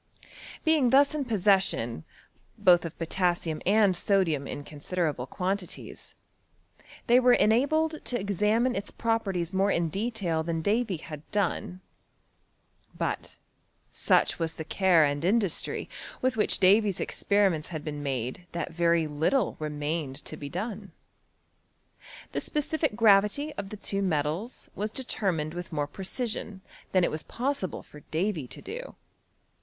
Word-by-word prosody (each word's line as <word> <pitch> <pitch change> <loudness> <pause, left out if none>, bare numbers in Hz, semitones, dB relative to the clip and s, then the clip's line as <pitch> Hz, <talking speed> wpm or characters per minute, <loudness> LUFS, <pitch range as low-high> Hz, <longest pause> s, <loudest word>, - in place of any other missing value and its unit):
Being 310 -6 +4
thus 280 +3 +5
in 295 -3 -2
possession, 195 - +2 0.5
both 180 -4 +5
of 165 - -7
potassium 170 -2 -1
and 200 -2 +4
sodium 170 -7 +1
in 145 - -5
considerable 150 -3 -3
quantities, 185 +3 -4 0.9
they 245 +1 +6
were 250 -1 +6
en 215 - +4
abled 310 +6 +1
to 245 - -1
examine 210 +5 +1
its 200 +1 -3
properties 195 -6 -1
more 195 +1 +2
in 170 -3 +1
detail 195 -4 -1
than 165 0 -2
Davy 210 -2 +1
had 150 -1 -10
done: 185 -2 -1 1.2
but - - -3 0.6
such - - +2
was 165 -1 -1
the 160 - -5
care 180 -1 +4
and 145 +1 -1
in 195 +7 +4
dustry 195 -7 -2 0.3
with 255 -1 +1
which 215 - +1
Davy's 200 0 +4
experiments 195 -7 +1
had 155 -4 -6
been 145 -1 -4
made 135 +4 -3
that 170 0 -3
very 170 -1 +3
little 160 - +1
remained 150 -1 -3
to - - -6
be 145 - -7
done. 200 +1 -5 1.4
The - - -2
specific 300 -3 -1
gravity 220 +7 +4
of 195 - -6
the 215 - -7
two 200 0 -2
metals 165 - -2
was 210 +2 -2
determined 190 - -2
with 175 0 -6
more 150 -2 -1
precision 200 - -4 0.3
than 185 -2 +3
it - - +2
was 155 - -3
possible 250 - -3
for 150 - -14
Davy 165 -4 -1
to - - -8
do. - - -7
190 Hz, 140 wpm, -28 LUFS, 160-220 Hz, 1.4 s, they